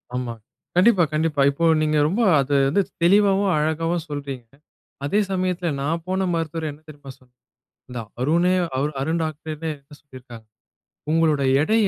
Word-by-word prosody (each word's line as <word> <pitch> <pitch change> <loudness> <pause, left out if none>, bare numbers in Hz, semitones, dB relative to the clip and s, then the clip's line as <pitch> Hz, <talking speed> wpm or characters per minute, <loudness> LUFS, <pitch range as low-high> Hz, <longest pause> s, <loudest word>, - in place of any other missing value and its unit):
ஆமா. 125 -2 -3 0.4
கண்டிப்பா 185 0 +5
கண்டிப்பா. 155 -2 0
இப்போ 165 +4 -1 0.2
நீங்க 155 0 +1 0.4
அத 135 0 -1 0.2
வந்து 200 +8 +2 0.2
தெளிவாவும் 195 +1 +4
அழகாவும் 165 +2 -1
சொல்றீங்க. 140 -4 -6 0.6
அதே 200 +9 +1
சமயத்தில 180 -2 -1
நான் 165 +4 -2
போன 190 +1 0
மருத்துவர் 165 -1 -2
என்ன 145 +2 -15
தெரியுமா 145 -3 -11
சொன்னார்? 125 -1 -28 0.5
இந்த 125 -1 -5 0.2
அருணே! 170 +7 +2 0.5
அருண் 160 +5 -1
டாக்டர் 155 0 -5 0.2
என்ன 145 -1 -10
சொல்லியிருக்காங்க. 125 -5 -13 0.7
உங்களுடைய 155 -4 +2
எடைய 215 +4 +2
155 Hz, 130 wpm, -22 LUFS, 140-175 Hz, 0.7 s, கண்டிப்பா